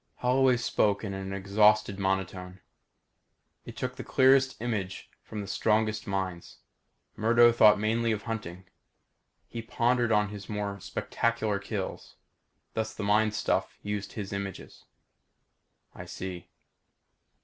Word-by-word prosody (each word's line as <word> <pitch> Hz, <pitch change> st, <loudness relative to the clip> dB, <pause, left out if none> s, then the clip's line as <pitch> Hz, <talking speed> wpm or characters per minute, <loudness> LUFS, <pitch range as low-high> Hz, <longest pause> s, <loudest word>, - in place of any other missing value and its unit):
Holloway 125 Hz, 0 st, +3 dB
spoke 105 Hz, -3 st, +1 dB
in 100 Hz, -2 st, -4 dB
an 95 Hz, 0 st, -5 dB
exhausted 100 Hz, +1 st, +3 dB
monotone. 95 Hz, -1 st, -2 dB, 1.1 s
"It -, -, -10 dB
took 130 Hz, 0 st, -4 dB
the 130 Hz, -, -5 dB
clearest 135 Hz, 0 st, +4 dB
image 105 Hz, -5 st, -4 dB
from 105 Hz, -, -7 dB
the 100 Hz, -, -7 dB
strongest 110 Hz, +2 st, 0 dB
minds. 95 Hz, -3 st, -4 dB, 0.6 s
Murdo 120 Hz, +2 st, +5 dB
thought 105 Hz, -2 st, +6 dB
mainly 115 Hz, +2 st, +1 dB
of 105 Hz, -1 st, -2 dB
hunting. 95 Hz, -5 st, -5 dB, 0.8 s
He 115 Hz, -, -6 dB
pondered 120 Hz, +1 st, +1 dB
on 105 Hz, -1 st, +3 dB
his 105 Hz, -2 st, -9 dB
more 105 Hz, -1 st, -3 dB
spectacular 110 Hz, -2 st, -1 dB
kills. 100 Hz, -1 st, -5 dB, 0.6 s
Thus 110 Hz, 0 st, -3 dB
the 105 Hz, -, -5 dB
mind 105 Hz, +1 st, +2 dB
stuff -, -, -1 dB
used 105 Hz, -1 st, -4 dB
his 100 Hz, -2 st, -5 dB
images." 100 Hz, -1 st, -6 dB, 1.1 s
"I -, -, -9 dB
see." 90 Hz, -2 st, -7 dB
105 Hz, 125 wpm, -28 LUFS, 100-115 Hz, 1.1 s, thought